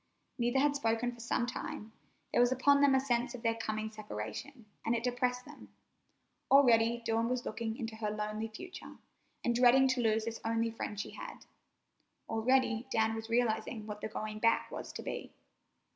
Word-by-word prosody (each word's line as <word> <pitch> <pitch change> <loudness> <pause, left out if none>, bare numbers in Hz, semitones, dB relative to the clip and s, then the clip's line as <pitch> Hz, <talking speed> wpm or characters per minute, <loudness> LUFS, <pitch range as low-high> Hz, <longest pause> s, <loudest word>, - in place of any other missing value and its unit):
Neither 240 +2 +1
had 285 +1 +3
spoken 230 -2 0
for 240 - -14
some 235 +1 0
time. 225 -3 -6 0.4
There - - +4
was 245 +1 +4
upon 280 +2 +4
them 280 -1 +6
a - - +5
sense 245 -1 0
of 240 - -10
their 230 -1 +3
coming 215 -1 -3
separation, 215 - -7 0.2
and 230 - +1
it 230 - -2
depressed 250 0 0
them. - - -13 0.8
Already 235 -3 +5
Dawn 225 +1 +1
was 250 -1 -1
looking 220 +1 -3
into 225 -2 -5
her 215 -1 -2
lonely 215 +1 -3
future, 360 +12 -9 0.5
and 240 - +2
dreading 250 +2 +6
to 260 -1 +1
lose 220 -1 +2
this 230 0 -5
only 230 0 0
friend 210 -2 -5
she - - -4
had. - - -9 0.8
Already 235 +1 +2
Dan 220 -2 +2
was 225 0 -6
realizing 230 -1 0
what 210 -1 -7
the - - -2
going 215 0 -5
back 230 +1 +2
was - - -6
to - - -6
be. - - -5
230 Hz, 180 wpm, -33 LUFS, 220-250 Hz, 0.8 s, them